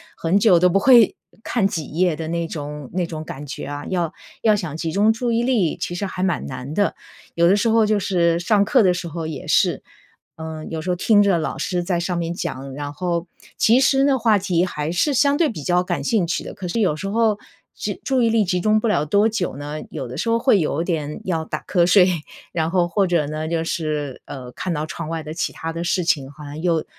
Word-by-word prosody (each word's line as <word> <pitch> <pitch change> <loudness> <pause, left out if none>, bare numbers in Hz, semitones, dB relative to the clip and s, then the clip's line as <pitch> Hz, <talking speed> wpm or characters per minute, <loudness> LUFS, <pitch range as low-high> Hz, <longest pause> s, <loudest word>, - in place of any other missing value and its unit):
很 170 +4 +1
久 200 -5 +5
都 180 +1 +4
不 185 - +2
会 235 0 +6 0.3
看 215 -5 +1
几 160 -6 -4
页 175 0 +2
的 160 +1 -5
那 170 0 -2
种 150 -3 -6
那 180 0 0
种 155 -2 -6
感 140 -1 -8
觉 140 - -6
啊， 145 +1 -5
要 175 -4 -1 0.3
要 215 -2 +5
想 170 -7 -4
集 165 0 -3
中 205 +5 +4
注 235 +2 -1
意 230 0 +2
力， 235 -9 +1
其 175 - -4
实 200 +3 -2
还 185 -1 -5
蛮 185 -1 0
难 130 +2 -6
的。 205 - +2 0.4
有 170 0 +3
的 190 - +5
时 205 +3 +1
候 225 0 +4
就 215 - +2
是 170 -4 +2
上 200 +4 +2
课 225 +3 +4
的 185 -2 +4
时 180 -1 -4
候 165 0 -5
也 155 -4 -6
是， - - +2 0.5
嗯， 160 -1 -7
有 160 - -4
时 185 - -1
候 - - +1
听 205 +3 +4
着 195 -4 +3
老 155 - -3
师 180 -1 -1
在 175 -1 0
上 175 +1 -2
面 170 -1 -2
讲， 140 -6 -5
然 145 0 -5
后， 170 +1 -2 0.3
其 235 +4 +5
实 270 0 +3
呢， 275 -2 +3
话 220 -2 +4
题 185 -3 +1
还 155 -4 -3
是 270 - +1
相 280 +3 +4
对 315 0 +2
比 160 -10 -6
较 180 +2 +2
感 180 - -3
兴 215 -8 +1
趣 165 - -2
的， - - -8
可 185 - -6
是 225 +7 -2
有 185 -8 +2
时 195 +6 -5
候 215 -1 +2 0.4
就 - - -3
注 265 -2 +1
意 230 - +3
力 225 -2 +2
集 180 0 0
中 215 +1 +3
不 230 - -1
了 210 -9 +2
多 200 +8 +3
久 200 -10 -2
呢， 145 +1 -5
有 130 - -5
的 120 - -8
时 230 - -2
候 230 - +3
会 230 -3 +3
有 160 0 0
点 155 -3 -3
要 165 -4 -1
打 - - -5
瞌 175 -3 +3
睡。 180 0 +6 0.4
然 160 -1 -1
后， 175 0 +2
或 190 +3 +1
者 170 -4 +1
呢， 155 +2 -4
就 165 0 -1
是， 150 -5 -3
呃， 125 -2 -8
看 185 - -4
到 150 +1 -2
窗 160 0 -6
外 165 -1 -3
的 155 0 -6
其 165 - -2
他 165 0 -5
的 165 +1 -4
事 180 +1 0
情， 140 -5 0
好 150 +1 -12
像 145 +2 -7
又 170 -3 +1
175 Hz, 265 characters per minute, -21 LUFS, 160-205 Hz, 0.5 s, 会